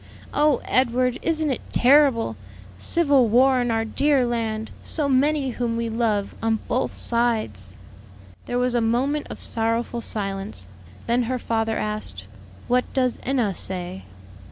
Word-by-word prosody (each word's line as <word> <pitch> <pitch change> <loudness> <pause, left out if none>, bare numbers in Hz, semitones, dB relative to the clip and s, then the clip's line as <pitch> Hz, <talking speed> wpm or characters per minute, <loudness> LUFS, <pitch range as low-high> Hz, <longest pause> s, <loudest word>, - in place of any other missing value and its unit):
"Oh, 295 -2 +3
Edward! 250 0 +1
isn't 315 -3 +1
it 255 - -3
terrible? 255 - +4 0.4
Civil 280 - +3
war 255 +3 +4
in 245 - -1
our 225 -1 0
dear 275 +3 +2
land! 225 -2 -2
So 300 -3 -1
many 275 0 +2
whom 235 -1 -2
we 230 0 -2
love 220 -3 -1
on 225 0 +1
both 255 - -1
sides!" 215 - -1 0.7
There 245 - -1
was 250 0 +1
a 240 - +2
moment 260 +6 0
of - - -8
sorrowful 230 +1 -1
silence. 195 - -3 0.4
Then 240 +1 +2
her 255 - 0
father 225 -2 -1
asked, 210 - -4 0.4
"What 250 +1 +1
does 255 -2 +1
Enna 245 -7 0
say?" 185 +1 -3
235 Hz, 140 wpm, -23 LUFS, 220-260 Hz, 0.7 s, terrible